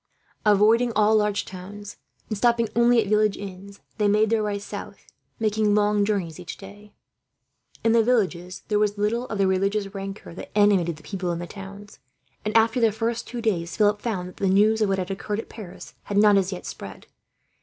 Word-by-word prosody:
Avoiding 220 +4 +4
all 215 +1 +4
large 210 -1 +1
towns, 200 +2 -9 0.3
and 215 - -3
stopping 235 +1 +2
only 235 0 +5
at 220 - +1
village 210 0 +2
inns, 200 0 -9 0.2
they 210 - +3
made 210 +1 +3
their 225 -1 +2
way 205 -1 -1
south; 200 - -8 0.3
making 215 -2 +1
long 210 0 +2
journeys 190 -7 -2
each 180 - -8
day. 205 +1 -13 0.9
In 225 - +3
the 230 0 +5
villages 185 -7 0
there 210 -1 +1
was 210 -1 +1
little 230 +4 0
of 215 - -4
the 195 - +2
religious 195 +2 0
rancour 195 -2 -7
that 185 - -8
animated 195 -5 +3
the 155 - -17
people 185 -3 -3
in 170 - -2
the 175 - -5
towns 200 +2 -11 0.4
and, 215 +2 +2
after 225 +2 +3
the 225 -2 +4
first 225 +2 -3
two 240 -1 -5
days, 175 -7 -1
Philip 210 -1 +3
found 195 -6 -3
that 180 - -13
the 195 - 0
news 210 +4 +3
of 210 - +2
what 195 - +1
had 185 0 -3
occurred 205 +2 -3
at - - -7
Paris 205 -6 -10
had 200 - -2
not, 205 0 +6
as 195 -1 +2
yet, 185 - -6
spread. - - -9
205 Hz, 200 wpm, -24 LUFS, 195-215 Hz, 0.9 s, not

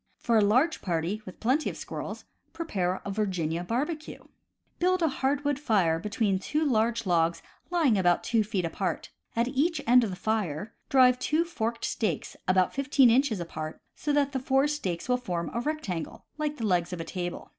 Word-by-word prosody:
For 235 - 0
a 220 - +6
large 255 +11 +3
party, 175 +4 -1
with 185 - -10
plenty 260 +7 +1
of - - -7
squirrels, - - -6 0.3
prepare 195 - -2
a 200 - -3
Virginia 180 -5 -1
Barbecue. 300 - -3 0.3
— - - -46
Build 365 0 +2
a - - +4
hardwood 280 0 0
fire 190 - +2
between 205 0 0
two 305 +10 -1
large 230 -3 +1
logs 170 -2 +1 0.3
lying 310 - +3
about 175 -2 +3
two 230 -2 +2
feet 200 -4 -2
apart. 185 +3 -3 0.2
At 235 +2 +1
each 295 +4 +1
end 245 +1 +6
of 220 - -1
the 185 - -4
fire 210 -2 -2 0.2
drive 255 -3 +5
two 310 +6 +1
forked 230 -8 -3
stakes 220 - -2
about 185 0 +3
fifteen 275 -2 +4
inches 245 -4 +2
apart, 155 -2 -6 0.2
so 295 - -2
that 285 -1 +2
the 265 - -1
four 270 +2 +2
stakes 195 - -3
will 250 0 +2
form 175 -9 -3
a 235 - -1
rectangle, 240 - -4
like 300 -1 -1
the 225 - -2
legs 175 -3 +1
of 180 - -4
a - - -2
table. 175 +1 -5
225 Hz, 190 wpm, -28 LUFS, 185-280 Hz, 0.3 s, a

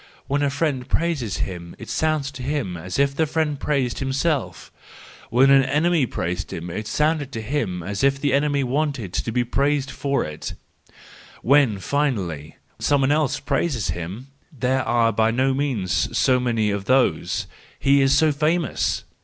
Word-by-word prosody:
When 140 +1 0
a 145 - +2
friend 140 -3 -2
praises 150 - -1
him 85 -2 -8
it - - -10
sounds 155 -3 0
to 135 -2 -9
him 130 -9 -2
as 90 +2 -5
if 140 0 +2
the 160 +2 +1
friend 150 -2 -1
praised 135 -6 -1
himself; 135 +2 -1 0.6
when 130 +4 +5
an 135 -1 +6
enemy 150 +1 +2
praises 90 -1 -3
him, 85 -2 -5
it 105 +4 -5
sounds 150 -1 +1
to 125 -4 -6
him 110 - -2
as 100 +7 -3
if 140 0 +3
the 140 -1 0
enemy 140 0 +2
wanted 130 - -2
to 115 - -2
be 125 +2 +1
praised 140 +2 0
for 140 +1 -1
it; 75 - -6 0.9
when, 135 -5 +4
finally, 95 - -2 0.2
some 145 -1 +2
one 135 +1 +2
else 150 -3 +1
praises 140 - -1
him—there 130 - -4
are 120 -2 +3
by 110 +2 +3
no 130 +3 +1
means 130 - -1
so 130 -1 +3
many 115 -4 0
of 100 -1 -3
these, 130 0 +1 0.3
he 140 0 +4
is 135 +1 +4
so 155 0 +4
famous! 155 0 0
135 Hz, 165 wpm, -23 LUFS, 115-145 Hz, 0.9 s, an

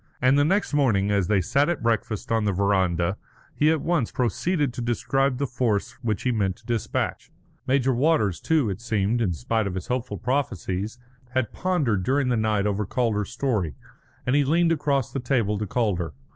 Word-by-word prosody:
And 130 +2 +4
the 145 - +4
next 195 +3 +1
morning, 110 -9 +2
as 100 -3 +1
they 100 -1 +3
sat 140 - +2
at 175 -8 -2
breakfast 110 -2 -1
on 115 -2 +2
the 100 - +2
verandah, 95 -2 +1 0.4
he 150 - +3
at 160 -2 +2
once 165 -7 0
proceeded 140 - 0
to 120 - -5
describe 130 +3 0
the 140 - 0
force 120 -5 -1
which 110 -4 -2
he 125 - +1
meant 100 -5 0
to - - -24
despatch. 115 -3 -2 0.4
Major 130 0 +2
Walters, 125 - +2
too, 155 -7 +2
it 100 +2 -4
seemed, 115 0 0
in 95 -6 +1
spite 110 +2 -1
of 95 - -4
his 95 - -6
hopeful 125 0 -2
prophecies, 110 -5 -2 0.4
had 130 -4 0
pondered 150 - 0
during 130 +6 +1
the 125 - +2
night 110 -2 +1
over 105 0 0
Calder's 105 -2 -1
story, 110 - -1 0.5
and 125 - +2
he 145 - +4
leaned 165 +4 +3
across 140 -5 0
the 135 - -3
table 115 -5 0
to 105 - -3
Calder. 95 -8 -1
120 Hz, 190 wpm, -25 LUFS, 100-135 Hz, 0.5 s, And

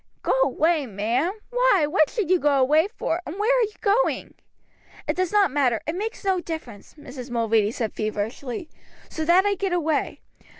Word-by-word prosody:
"Go - - 0
away, 295 +2 +2
ma'am! 230 - -1 0.2
Why, - - +3
what 310 -1 +3
should 400 -7 -2
you 370 - +4
go 285 -2 +2
away 305 +7 +4
for, 360 -5 -3
and 335 +3 -7
where 440 +5 +2
are - - +3
you 430 -2 -1
going?" 430 +4 +1 0.7
"It - - 0
does 370 -1 -1
not 410 -7 +3
matter; 255 -5 +1
it 315 - -2
makes 425 +3 -5
no 380 -2 +2
difference," 285 - -8
Mrs. 260 -3 -10
Mulready 225 -3 +1
said 225 -1 -3
feverishly, 220 +7 -4 0.4
"so 315 - -4
that 350 +4 +4
I 405 - +2
get 390 -1 -2
away. 320 -4 -1
315 Hz, 180 wpm, -24 LUFS, 250-385 Hz, 0.7 s, you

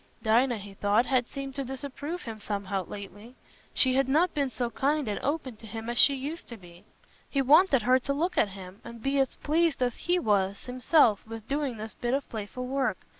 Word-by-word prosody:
Dinah, 235 +2 +3
he 200 -1 -10
thought, 205 +4 +2
had 250 -2 +1
seemed 275 -1 -6
to 275 0 -3
disapprove 280 +6 -6
him 225 -2 -7
somehow 200 -2 -3
lately; 205 +4 -10 0.4
she 260 -1 +3
had 265 0 +2
not 325 +6 +3
been 280 -3 0
so 245 -2 -3
kind 285 +4 0
and 205 - -2
open 275 -5 -2
to 220 - -12
him 225 +2 -5
as 240 - -1
she 280 - +7
used 290 +6 -6
to 235 - -8
be. 175 -2 -16 0.5
He 275 -1 +1
wanted 285 - +5
her 255 +2 +4
to 280 - -3
look 335 +6 -1
at 210 - +3
him, 190 0 -11
and 235 -1 -10
be 275 +1 +1
as 270 -2 +1
pleased 325 +1 +1
as 245 -2 0
he 355 +1 +1
was 200 - 0
himself 250 -3 +3
with 225 -1 -8
doing 280 -3 -1
this 215 +1 -7
bit 240 +2 -1
of 275 - -3
playful 225 +3 -5
work. 255 -6 0
250 Hz, 215 wpm, -28 LUFS, 215-275 Hz, 0.5 s, she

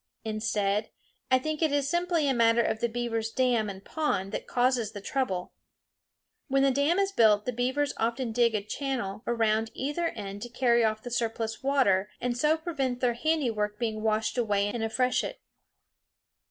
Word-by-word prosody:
Instead, 215 -1 0 0.4
I 260 - +5
think 310 +4 -3
it 315 -2 +3
is 285 -1 +1
simply 345 -1 +1
a 270 - +3
matter 230 -1 +4
of 220 - -1
the 235 - 0
beaver's 230 -1 -2
dam 240 -3 +1
and 195 0 -9
pond 200 -12 -1
that - - -5
causes 245 -3 +1
the 205 - -6
trouble. 195 -5 -2 0.9
When 275 -1 +2
the 275 - +4
dam 285 +6 +2
is 395 0 +1
built 215 - +4
the 250 - -1
beavers 260 +4 0
often 235 +2 -1
dig 235 -1 +2
a 205 - -1
channel 215 -3 -3
around 225 -1 +1
either 295 +6 -1
end 200 -6 -6
to 240 - -6
carry 240 -1 +3
off 215 -1 0
the 245 - -6
surplus 225 -1 -2
water, 230 -8 +2
and 245 0 -1
so 300 +6 +2
prevent 275 -7 -2
their 245 -2 +2
handiwork 235 -7 0
being 220 -1 -2
washed 220 +2 0
away 205 -3 +1
in 235 +2 -3
a 225 - -1
freshet. 250 +3 0
235 Hz, 180 wpm, -28 LUFS, 215-270 Hz, 0.9 s, I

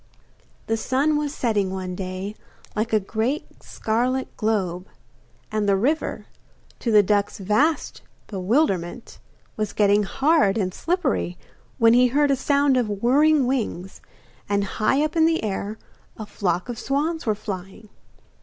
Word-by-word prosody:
The 225 - 0
sun 270 +7 +1
was 295 -1 -1
setting 215 -8 0
one 185 -1 -4
day, 185 +2 -5 0.4
like 220 +2 -1
a 215 - +4
great 225 - -3
scarlet 250 +4 -2
globe, 190 -4 -1 0.6
and 215 -1 0
the 200 - +4
river, 275 +11 -1 0.5
to 240 - -2
the 210 -1 +6
duckling's 205 0 0
vast 215 - 0 0.2
bewilderment, 195 - -1 0.4
was 215 -1 -2
getting 205 0 +3
hard 270 0 +2
and 185 -4 -1
slippery, 300 - -1 0.4
when 230 0 +5
he 250 +1 +6
heard 285 +3 +2
a - - +4
sound 280 0 +2
of 240 -4 0
whirring 290 +3 +4
wings, 220 -8 -3 0.5
and 200 0 +1
high 215 +8 +1
up 310 +2 -2
in 325 -1 +5
the 325 -5 0
air 210 +1 -3 0.4
a 215 - -6
flock 185 -2 -2
of 240 -2 -5
swans 305 +2 -1
were 215 - +2
flying. 195 +1 -7
220 Hz, 145 wpm, -23 LUFS, 200-275 Hz, 0.6 s, the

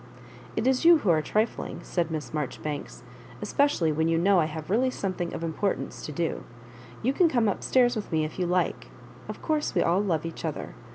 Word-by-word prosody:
" - - -18
It - - 0
is 260 +2 +2
you 335 0 +8
who 210 - +2
are 155 -2 +3
trifling," 215 +8 -1
said 170 -3 -1
Miss 155 -2 -4
Marjo 150 -3 -3
ribanks, 145 -5 -5 0.2
*' 120 0 -18
especially 280 - +2
when 160 +2 +1
you 165 0 +2
know 190 +2 +4
I 160 - +3
have 155 +2 -6
really 250 +5 +3
something 185 -7 -3
of - - -5
importance 165 +5 -2
to - - -5
do. 165 +3 -2 0.6
You 260 +4 +2
can 340 +3 +4
come 240 -6 +2
up 200 - -1
stairs 245 -1 +3
with 215 - -5
me 155 -1 +1
if 155 - -7
you 180 - +1
like. 180 +1 0 0.4
Of - - -7
course 310 -2 0
we - - +4
all 175 +4 +2
love 165 -6 0
each 165 - -6
other. - - -4
175 Hz, 225 wpm, -27 LUFS, 160-230 Hz, 0.6 s, you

